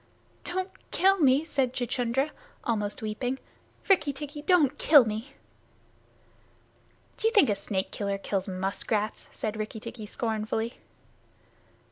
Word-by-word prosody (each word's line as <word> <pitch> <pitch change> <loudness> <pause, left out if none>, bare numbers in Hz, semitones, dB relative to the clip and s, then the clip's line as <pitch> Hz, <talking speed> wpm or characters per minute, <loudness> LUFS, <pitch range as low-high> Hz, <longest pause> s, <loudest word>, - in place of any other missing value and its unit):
"Don't 375 +1 -1 0.2
kill 385 +1 +4
me," 280 0 +4
said 265 -5 0
Chuchundra, 250 +3 0 0.3
almost 210 -3 -1
weeping. 245 +5 -2 0.5
"Rikki 370 -7 +4
tikki, 290 +2 -7
don't 295 -4 +3
kill 290 -6 +7
me!" 220 +6 -4 1.8
"Do 445 - +2
you 455 - +1
think 285 - +6
a - - +4
snake 195 -1 -3
killer 200 -1 -2
kills 195 0 -2
muskrats?" 200 +3 -2
said 215 0 -3
Rikki 215 +1 -4
tikki 225 -1 -8
scornfully. 220 +1 -2
235 Hz, 120 wpm, -28 LUFS, 215-290 Hz, 1.8 s, kill